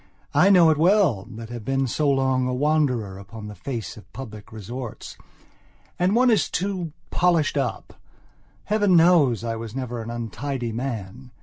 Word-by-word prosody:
I - - +5
know 175 -5 +7
it 155 - 0
well, 165 - +3
that 115 -1 -9
have 120 -2 -7
been 135 +4 0
for 120 - -3
so 150 -2 +1
long 130 -2 +2
a 125 - -1
wanderer 130 -9 0
upon 105 +2 -10
the 105 - -7
face 110 +1 -6
of 105 - -15
public 110 -3 -9
resorts. 115 +3 -7 0.8
And 185 +4 +2
one 250 0 +5
is 220 - +2
too 180 -4 -3 0.2
polished 170 -5 +2
up. 135 -3 -2 0.7
Heaven 205 -3 +2
knows 160 - +4
I 115 -1 -2
was 115 0 -7
never 125 -3 -4
an 110 - -7
untidy 120 +2 -4
man. 120 0 -5
130 Hz, 170 wpm, -24 LUFS, 115-160 Hz, 0.8 s, know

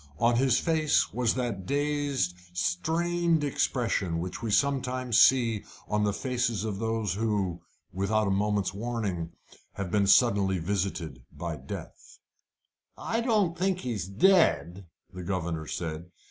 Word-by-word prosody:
On 120 +4 +3
his 130 0 +3
face 160 -3 +1
was 125 -2 +1
that 115 -8 -3
dazed, 145 -8 0 0.2
strained 165 - 0
expression 115 -10 0
which 90 +4 -5
we 115 - -3
sometimes 130 0 +2
see 115 -5 +4 0.2
on 105 0 0
the 105 - +2
faces 120 -1 -1
of 105 -3 -3
those 110 -4 -1
who, 100 -5 -1 0.3
without 105 +4 +1
a 100 - 0
moment's 100 -1 0
warning, 100 -6 -3 0.4
have 95 -3 -5
been 100 0 +2
suddenly 100 -4 +4
visited 85 -7 -3
by 85 -2 -5
death. 70 -2 -9 0.8
"I 230 +1 -1
don't 210 -8 +1
think 185 +1 0
he's 110 -8 -3
dead," 100 - +3 0.3
the 90 - -7
governor 85 -4 -3
said. 80 +1 -5
105 Hz, 130 wpm, -28 LUFS, 95-130 Hz, 0.8 s, see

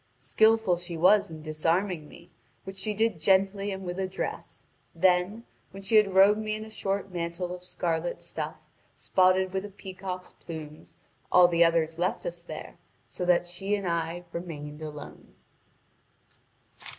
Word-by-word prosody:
Skilful 195 - +3
she 175 -1 -6
was 200 +4 +5
in 155 -1 -9
disarming 165 +2 0
me, - - -15 0.3
which 195 0 -8
she 210 +2 -2
did 220 -4 +1
gently 195 +3 +2
and 190 -1 -5
with 175 +1 -4
address; 190 0 -4 0.3
then, 180 +5 +2 0.3
when 195 +1 -10
she 215 +3 +4
had 200 -3 +4
robed 200 +2 +7
me 215 0 -2
in 215 0 -6
a 220 - -12
short 195 -2 -2
mantle 175 +1 -3
of 180 0 -8
scarlet 170 -2 -2
stuff - - -6 0.3
spotted 185 0 +3
with 190 0 -1
a 205 - -7
peacock's 185 -2 -7
plumes, 155 -2 -10 0.3
all 180 -1 +8
the 170 -1 +4
others 165 -1 +2
left 185 - -1
us - - -4
there, - - -9 0.3
so 180 - -4
that 175 0 +4
she 195 +4 -2
and 200 -2 -3
I 170 +1 -2
remained 150 -4 -6
alone. 150 -1 -9
180 Hz, 155 wpm, -28 LUFS, 170-195 Hz, 0.3 s, all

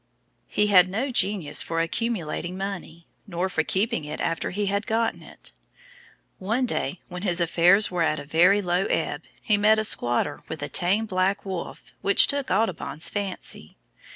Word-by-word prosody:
He 210 - +1
had 185 -3 +5
no 235 +8 -2
genius 195 -9 +2
for 165 0 -3
accumulating 175 -2 -2
money 185 -4 -6 0.2
nor 180 0 -2
for 160 - 0
keeping 210 +3 0
it 150 - -6
after 165 -1 -2
he 205 +2 -2
had 200 +1 -1
gotten 225 +1 0
it. - - -11 0.9
One 225 +7 0
day 210 -5 -3
when 180 -1 -7
his 180 -3 +1
affairs 175 +4 +4
were 180 -1 -1
at 155 -2 +1
a 140 - -8
very 180 +7 +4
low 180 +2 0
ebb, - - -2 0.2
he 210 -3 +3
met 215 +1 +4
a 215 - +1
squatter 135 - 0
with 160 - -5
a - - -4
tame 195 +5 +2
black 190 0 -1
wolf 190 -3 -7
which 200 - +5
took 280 -1 -1
Audubon's 185 -5 -1
fancy. 195 - -5
190 Hz, 170 wpm, -25 LUFS, 170-210 Hz, 0.9 s, had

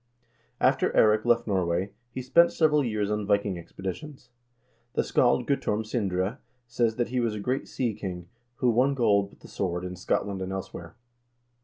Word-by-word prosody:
After - - +3
Eirik 110 +1 +5
left 120 0 +3
Norway, 95 -1 0 0.2
he 130 +1 -6
spent 170 +7 +5
several 150 -2 +3
years 105 -4 -1
on 105 -1 -2
Viking 100 -1 +2
expedi 90 +2 -5
tions. 140 - -12 0.6
The - - +1
scald 120 0 +2
Guttorm 110 -6 0
Sindre 100 +1 -1 0.3
says 120 -1 0
that 120 -1 -1
he 125 +1 -1
was 115 -3 0
a - - -4
great 125 +6 -2
sea 120 -4 -1
king, 90 -4 -6 0.3
who 125 0 +2
won 130 +4 +2
gold 100 -5 +2
with - - -22
the - - -12
sword 90 -2 -3
in 90 0 -5
Scotland 95 +1 -1
and 95 0 -4
elsewhere. 90 -2 -7
105 Hz, 175 wpm, -27 LUFS, 95-125 Hz, 0.6 s, Eirik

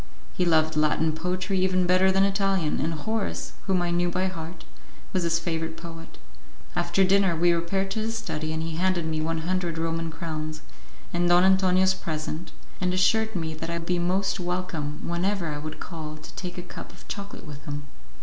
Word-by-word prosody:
He 180 - +1
loved 160 -2 +3
Latin 155 +1 +3
poetry 185 +4 -1
even 185 -1 +3
better 185 +1 +5
than 195 +1 +4
Italian, 195 -4 +2
and 165 +1 0
Horace, 220 +7 -2
whom 185 -2 +3
I 175 - 0
knew 175 0 +2
by 185 +2 0
heart, 170 -2 -5 0.5
was 185 - +2
his 170 -1 +2
favourite 165 -1 -2
poet. 165 -1 -9 0.6
After 175 +2 +3
dinner, 190 -2 +4
we 175 +2 +4
repaired 190 +3 0
to 220 - -1
his 225 +1 -1
study, 155 -8 -3
and 160 0 -2
he 160 -1 -3
handed 180 -2 +2
me 155 -1 -1
one 160 +1 -1
hundred 175 -1 -1
Roman 165 0 -1
crowns, 155 -1 -4 0.5
and 175 0 +2
Don 175 +1 +7
Antonio's 190 0 +5
present, 160 -2 -4 0.3
and 180 0 +1
assured 220 +4 +3
me 160 -3 -1
that 165 +1 -5
I 170 - -1
would 165 - -6
be 180 0 +1
most 190 +3 +1
welcome 175 -4 -3
whenever 175 0 0
I 150 -1 -3
would 155 +1 -6
call 155 -3 -6
to 155 - -11
take 180 -1 -6
a 180 - -4
cup 175 - -9
of - - -16
chocolate 200 0 -6
with 145 -2 -9
him. 145 0 -4
175 Hz, 195 wpm, -27 LUFS, 160-185 Hz, 0.6 s, Don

